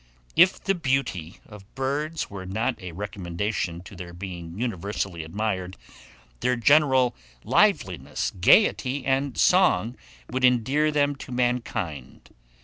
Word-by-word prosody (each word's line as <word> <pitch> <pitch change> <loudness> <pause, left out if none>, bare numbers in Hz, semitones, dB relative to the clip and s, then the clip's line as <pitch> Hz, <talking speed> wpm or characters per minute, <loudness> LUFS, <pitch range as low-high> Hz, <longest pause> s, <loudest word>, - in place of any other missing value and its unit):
IF 180 +3 +5
THE 195 - 0
BEAUTY 130 - -2
OF 105 -2 -12
BIRDS 145 +4 -2
were 95 -2 -8
not 110 +4 -2
a 90 -1 -7
recommendation 90 -1 -3
to 95 - -12
their 85 -1 -8
being 85 -1 -7
universally 100 -6 -3
admired, 95 +1 -3 0.6
their 125 - +1
general 130 0 +4 0.3
liveliness, - - +1
gaiety, 130 - +3
and 135 0 0
song 180 - +3 0.3
would 130 +1 -3
endear 130 +5 +3
them 145 -1 +1
to 135 - -10
mankind. 115 - -3
115 Hz, 120 wpm, -25 LUFS, 95-135 Hz, 0.6 s, IF